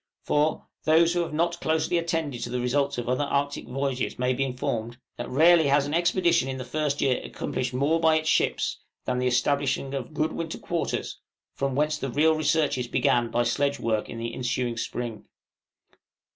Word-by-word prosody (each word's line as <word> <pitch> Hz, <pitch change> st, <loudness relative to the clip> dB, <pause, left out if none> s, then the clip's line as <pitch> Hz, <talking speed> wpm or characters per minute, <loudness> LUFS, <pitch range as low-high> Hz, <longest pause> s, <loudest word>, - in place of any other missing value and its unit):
For, 150 Hz, +1 st, +1 dB, 0.2 s
those 165 Hz, +2 st, +5 dB
who 175 Hz, -, 0 dB
have 170 Hz, -, -1 dB
not 170 Hz, +2 st, 0 dB
closely 160 Hz, +2 st, +1 dB
attended 165 Hz, -7 st, -2 dB
to -, -, -3 dB
the 125 Hz, +1 st, -2 dB
results 140 Hz, +3 st, 0 dB
of 120 Hz, -, -4 dB
other 130 Hz, +3 st, +1 dB
Arctic 140 Hz, 0 st, -1 dB
voyages 135 Hz, 0 st, -2 dB
may 125 Hz, +1 st, +1 dB
be 135 Hz, -, 0 dB
informed, 120 Hz, -3 st, -3 dB, 0.2 s
that -, -, -5 dB
rarely 160 Hz, +3 st, +5 dB
has 140 Hz, 0 st, +3 dB
an 145 Hz, -, -4 dB
expedition 170 Hz, -3 st, +2 dB
in 130 Hz, -, -3 dB
the 130 Hz, -, -6 dB
first 145 Hz, +2 st, -1 dB
year 130 Hz, -2 st, +2 dB
accomplished 125 Hz, -, -3 dB
more 140 Hz, +6 st, +1 dB
by 160 Hz, -1 st, +4 dB
its 155 Hz, 0 st, 0 dB
ships, -, -, +1 dB, 0.3 s
than 125 Hz, 0 st, -1 dB
the 125 Hz, -, +1 dB
establishing 135 Hz, +2 st, +1 dB
of 135 Hz, +2 st, -5 dB
good 155 Hz, +1 st, 0 dB
winter 165 Hz, -1 st, -4 dB
quarters, 170 Hz, -2 st, -3 dB, 0.3 s
from 135 Hz, -1 st, -2 dB
whence 150 Hz, +1 st, +1 dB
the 135 Hz, -, -3 dB
real 155 Hz, +6 st, +3 dB
researches 155 Hz, -5 st, +1 dB
began 120 Hz, -2 st, +2 dB
by 120 Hz, +1 st, +1 dB
sledge 140 Hz, +4 st, 0 dB
work 110 Hz, -2 st, -1 dB
in -, -, -7 dB
the 115 Hz, 0 st, -4 dB
ensuing 125 Hz, -1 st, -1 dB
spring. 115 Hz, -1 st, -4 dB
140 Hz, 185 wpm, -26 LUFS, 125-155 Hz, 0.3 s, those